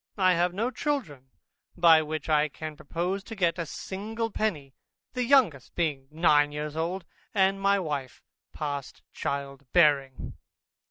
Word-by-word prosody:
I 185 -2 +4
have 175 +1 +2
no 225 +7 -1
children, 225 - -3 0.5
by 165 -2 +7
which 155 -1 -4
I 155 -1 +3
can 155 +2 -7
propose 175 +7 -3
to 225 - -7
get 175 -3 +1
a 170 - -2
single 220 +8 -4
penny; 150 -13 -2 0.4
the 250 - -1
youngest 235 - +3
being 145 -6 -1
nine 150 -2 +3
years 150 0 -5
old, 170 +3 -2 0.3
and 195 0 +3
my 200 0 +4
wife 145 -8 -4 0.3
past 145 -3 -5
child 140 0 -4
bearing. 145 -6 +3
165 Hz, 145 wpm, -27 LUFS, 145-195 Hz, 0.5 s, by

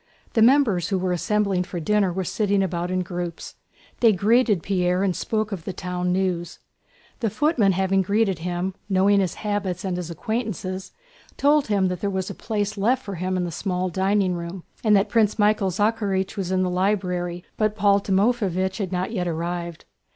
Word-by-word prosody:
The 225 - +3
members 230 - +4
who 195 - +1
were 185 0 -1
assembling 200 +1 +1
for 180 -1 -6
dinner 200 +2 +2
were 190 +2 -2
sitting 200 +1 +1
about 175 -1 -2
in 185 0 0
groups; 175 -1 -5 0.5
they 230 -2 +6
greeted 210 0 +3
Pierre 180 -1 +1
and 185 -3 +1
spoke 215 -1 -2
of 185 -5 -5
the 190 - -5
town 180 0 -2
news. 180 -2 -1 0.6
The 225 - 0
footman 245 - +2
having 190 +1 +2
greeted 200 -2 +1
him, 180 +2 -2 0.2
knowing 200 +1 +4
his 190 -3 0
habits 200 -3 -3
and 185 -2 -1
his 175 -2 -5
acquaintances, 190 0 -4 0.5
told 290 0 +3
him 200 -3 +2
there 180 +2 -2
was 190 -1 -2
a - - -6
place 210 -2 -3
left 250 +6 +2
for 200 - -5
him 185 +1 -2
in 180 - 0
the 175 - -4
small 185 +1 -2
dining 190 +1 +1
room 170 +1 -6 0.2
and 215 -2 +5
that 200 +1 +3
Prince 215 -1 +2
Michael 210 -2 +3
Zakhárych 200 -1 0
was 190 -2 -3
in 185 0 +2
the 180 - -1
library, 180 -2 -1
but 215 -1 0
Paul 200 -1 +3
Timoféevich 190 -2 +1
had 195 -3 -2
not 185 +2 -2
yet 180 -6 -2
arrived. 170 0 -4
190 Hz, 185 wpm, -23 LUFS, 180-210 Hz, 0.6 s, they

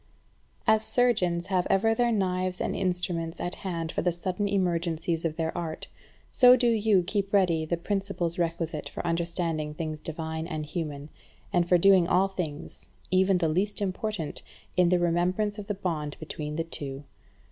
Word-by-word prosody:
13. 220 - +6
As 215 - -4
surgeons 185 -9 +2
have 185 -2 0
ever 225 +3 +3
their 240 +1 +2
knives 185 -3 0
and - - -1
instruments 175 -3 -2
at 175 - -2
hand 170 -4 -4
for - - -1
the 175 - +2
sudden 185 +4 -2
emergencies 170 -4 0
of 160 -2 -2
their 160 -1 -2
art, 160 -2 -4 0.4
so 250 0 +7
do 240 -1 +3
you 215 -4 +3
keep 200 +2 -1
ready 175 -5 +3
the 170 +2 -1
principles 190 -2 -2
requisite 165 -2 -2
for - - -6
understanding 165 -2 -1
things 155 -1 -4
divine 160 0 -4
and 155 -3 -4
human, 150 -2 -5 0.4
and 175 -1 +2
for 180 - +6
doing 185 -1 +5
all 190 +1 +3
things, 170 -6 -6 0.2
even 190 0 +4
the 170 -2 +1
least 190 +8 0
important, 200 -3 -3 0.3
in 180 -1 +4
the 180 - +4
remembrance 180 +5 +1
of 200 - -7
the 210 - -2
bond 155 -6 -3
between 150 0 -5
the 165 - 0
two. 140 -4 -4
175 Hz, 170 wpm, -28 LUFS, 165-195 Hz, 0.4 s, so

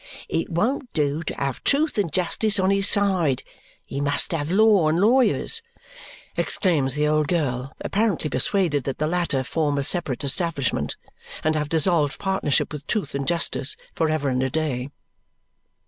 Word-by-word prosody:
It 165 - -1
won't 240 +9 -1
do 150 0 0
to 165 - -4
have 140 -2 -3
truth 295 -4 +2
and 170 -6 0
justice 200 +5 +1
on 190 +1 +3
his 195 0 +2
side; 185 -10 +1 0.4
he 140 - -4
must 145 0 +1
have 155 -3 -2
law 200 -3 +4
and 160 +2 +1
lawyers," 255 - +3 0.7
exclaims 145 -8 +1
the 150 0 +1
old 155 -1 +2
girl, 135 -6 -1
apparently 205 -6 0
persuaded 150 - +1
that 135 - -3
the 155 - 0
latter 165 -5 0
form 145 +1 -1
a 140 - 0
separate 145 -5 0
establishment 140 -1 -1 0.5
and 155 - +2
have 150 -1 -2
dissolved 160 -2 +2
partnership 190 -8 0
with 145 -1 -7
truth 205 -11 -2
and 140 -1 -3
justice 165 -4 0 0.2
for 160 - 0
ever 155 -2 0
and 130 0 0
a 130 - 0
day. 140 -3 -2
155 Hz, 160 wpm, -23 LUFS, 140-190 Hz, 0.7 s, law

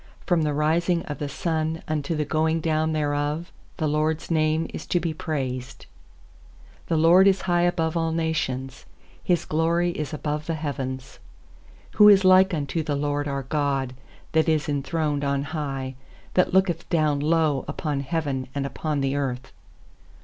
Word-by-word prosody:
3From 175 -4 +2
the 150 - +1
rising 170 +3 +1
of 145 - -6
the 145 - -3
sun 160 +1 -2
unto 155 +1 -1
the 150 -1 -1
going 160 +2 +1
down 160 0 0
thereof 150 +2 -1 0.3
The 160 - -1
LORD'S 155 +2 -1
name 155 0 +2
is - - -7
to 175 - +1
be 165 -1 -2
praised. 130 -5 -4 1.0
4The 160 - +2
LORD 175 +4 +6
is 195 -1 +3
high 175 -1 +1
above 175 -2 +1
all 165 -1 0
nations, 135 -5 -2 0.4
His 175 -2 +1
glory 170 +2 +1
is 150 -4 -4
above 150 0 -3
the 165 - -1
heavens. 135 -4 -5 0.7
5Who 210 0 +8
is 195 -1 +5
like 185 +1 +6
unto 155 0 -2
the 150 -2 -2
LORD 145 0 -1
our 140 -1 -2
God, 135 -2 -1 0.4
That 160 0 +2
is 155 -3 +1
enthroned 145 0 -1
on 140 0 0
high, 140 -4 -4 0.4
6That 180 - +3
looketh 185 -3 +1
down 155 -4 +2
low 155 -2 +2
Upon 150 -3 -2
heaven 140 -3 -2
and 140 -1 -1
upon 150 +1 -2
the 135 0 0
earth? 135 -2 -3
155 Hz, 160 wpm, -24 LUFS, 140-165 Hz, 1.0 s, 5Who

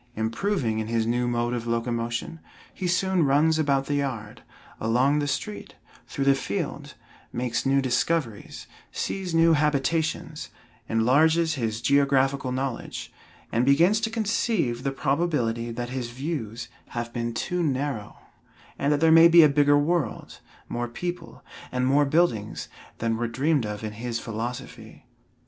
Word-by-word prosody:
Improving 115 - -1
in 110 - -3
his 115 -1 0
new 120 +2 0
mode 120 0 0
of 120 -1 -3
locomotion, 115 +5 -2 0.3
he 185 - -3
soon 185 0 +2
runs 150 +3 +3
about 140 -3 +1
the 145 - -2
yard, 130 -7 -3 0.4
along 125 +6 +2
the 145 - -1
street, 105 -7 -4 0.3
through 135 - -3
the 140 - +6
field, 115 -7 -4 0.4
makes 125 +1 -2
new 135 0 +3
discoveries, 130 -2 -1 0.3
sees 185 -4 -3
new 165 0 +5
habitations, 155 +1 0 0.4
enlarges 155 +9 +3
his 115 -5 -2
geographical 140 -1 +2
knowledge, 130 -1 -4 0.4
and 115 - +2
begins 170 +11 +4
to 225 - 0
conceive 215 - 0
the 135 +1 -1
probability 135 -5 0
that 120 +1 -4
his 125 -2 -4
views 125 -4 -5 0.2
have 120 0 -5
been 120 -1 -2
too 175 +10 -2
narrow, 135 -7 -2 0.6
and 140 - +1
that 145 0 +1
there 165 0 +5
may 165 +1 +9
be 170 0 +8
a - - +8
bigger 145 0 +4
world, 160 +1 -1 0.3
more 120 0 -3
people, 175 +7 -6 0.3
and 125 0 0
more 140 +3 +4
buildings 140 -9 0 0.3
than 115 -1 -1
were 120 0 -1
dreamed 135 +1 0
of 105 0 -6
in 110 - -3
his 115 +2 -4
philosophy. 115 +3 -7
135 Hz, 145 wpm, -25 LUFS, 120-160 Hz, 0.6 s, may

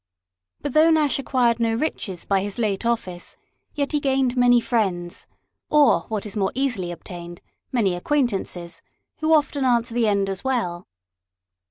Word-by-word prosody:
But 290 -3 -3
though 315 +2 +6
Nash 305 -4 +3
acquired 245 -4 +1
no 225 -1 +1
riches 210 - -3
by 195 -1 +2
his 200 0 -5
late 215 -1 -1
office, 185 -7 -3 0.4
yet 285 -2 -1
he 300 - +1
gained 265 -3 +1
many 245 -1 +5
friends, 190 -8 -2 0.4
or 300 -1 +4
what 215 -2 -3
is 210 - -7
more 195 -2 0
easily 245 -10 -1
obtained, 175 0 -8 0.3
many 215 -8 +1
acquaintances, 180 - -2 0.4
who 315 +1 0
often 290 -2 +2
answer 240 -2 +1
the 235 -2 +2
end 200 -1 +1
as 195 -1 -4
well. 225 -10 -2
230 Hz, 155 wpm, -23 LUFS, 190-265 Hz, 0.4 s, though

